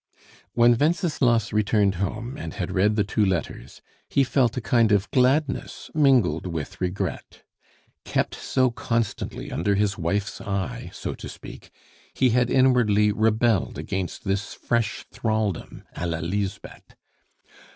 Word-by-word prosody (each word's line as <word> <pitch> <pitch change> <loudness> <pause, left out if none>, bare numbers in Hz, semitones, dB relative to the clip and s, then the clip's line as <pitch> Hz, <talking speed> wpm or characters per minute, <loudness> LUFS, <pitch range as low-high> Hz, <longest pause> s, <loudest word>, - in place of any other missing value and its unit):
When 120 0 +5
Wenceslas 145 - +1
returned 105 -2 +2
home 110 +6 -3
and 155 - -7
had 95 -6 -3
read 105 +3 +2
the 105 - +2
two 105 +2 0
letters, 95 -5 -3 0.3
he 140 - +3
felt 130 -2 +1
a - - +2
kind 115 -2 +2
of 100 -1 +2
gladness 130 +2 +1
mingled 125 - +3
with 85 +3 -5
regret. 90 +1 -4 0.6
Kept - - -1
so 130 -2 +1
constantly 115 -2 -3
under 100 -1 0
his 100 0 0
wife's 100 +5 -2
eye, 100 -2 -3
so - - -5
to - - -9
speak, - - -11 0.5
he 130 -2 +3
had 125 +1 +2
inwardly 120 -6 +4
rebelled 110 -1 +1
against 95 -2 -4
this 100 +1 -2
fresh 110 -4 -1
thraldom, 110 -5 -2
a 85 - -3
la 85 -1 -1
Lisbeth. 95 +4 -5
110 Hz, 135 wpm, -24 LUFS, 100-125 Hz, 0.6 s, When